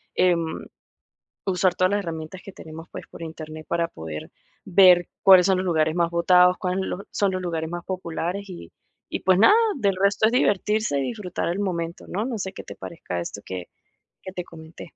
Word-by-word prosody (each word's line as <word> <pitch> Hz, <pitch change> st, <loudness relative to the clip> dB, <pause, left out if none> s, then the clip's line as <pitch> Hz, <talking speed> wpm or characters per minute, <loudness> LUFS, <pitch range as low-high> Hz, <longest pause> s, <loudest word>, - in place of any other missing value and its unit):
em, 170 Hz, -3 st, +1 dB, 0.8 s
usar 185 Hz, -1 st, +2 dB
todas 185 Hz, +1 st, +3 dB
las 205 Hz, -, +1 dB
herramientas 165 Hz, 0 st, -6 dB
que 195 Hz, -, -8 dB
tenemos, 160 Hz, -1 st, -11 dB
pues, -, -, -8 dB
por -, -, -11 dB
Internet 155 Hz, -1 st, -8 dB
para 170 Hz, 0 st, +1 dB
poder 80 Hz, -1 st, -8 dB, 0.3 s
ver 180 Hz, -2 st, +6 dB, 0.2 s
cuáles 185 Hz, -1 st, +8 dB
son 190 Hz, -1 st, +3 dB
los 185 Hz, -, -1 dB
lugares 160 Hz, -2 st, +2 dB
más 170 Hz, -1 st, +1 dB
votados, 180 Hz, +1 st, +5 dB
cuáles 185 Hz, +1 st, -1 dB, 0.3 s
son 200 Hz, -2 st, +1 dB
los 185 Hz, -, -2 dB
lugares 165 Hz, -2 st, -3 dB
más 175 Hz, 0 st, -5 dB
populares, 185 Hz, +2 st, -4 dB
y 170 Hz, -, -10 dB, 0.4 s
y -, -, -4 dB
pues 185 Hz, 0 st, +3 dB
nada, 315 Hz, -, +7 dB, 0.2 s
del 200 Hz, -6 st, +1 dB
resto 200 Hz, +3 st, +3 dB
es 225 Hz, -, +2 dB
divertirse 210 Hz, -, +1 dB
y -, -, 0 dB
disfrutar 185 Hz, -, -3 dB
el 180 Hz, +4 st, -2 dB
momento, 170 Hz, -3 st, -3 dB
¿no? 205 Hz, +5 st, -2 dB
No 245 Hz, -3 st, -3 dB
sé 190 Hz, 0 st, -4 dB
qué -, -, -9 dB
te -, -, -9 dB
parezca 90 Hz, -, -6 dB
esto 100 Hz, +4 st, -6 dB
que 90 Hz, -2 st, -6 dB, 0.5 s
que 185 Hz, -, -8 dB
te 180 Hz, -, -4 dB
comenté. 160 Hz, -1 st, -12 dB
180 Hz, 195 wpm, -24 LUFS, 165-190 Hz, 0.8 s, cuáles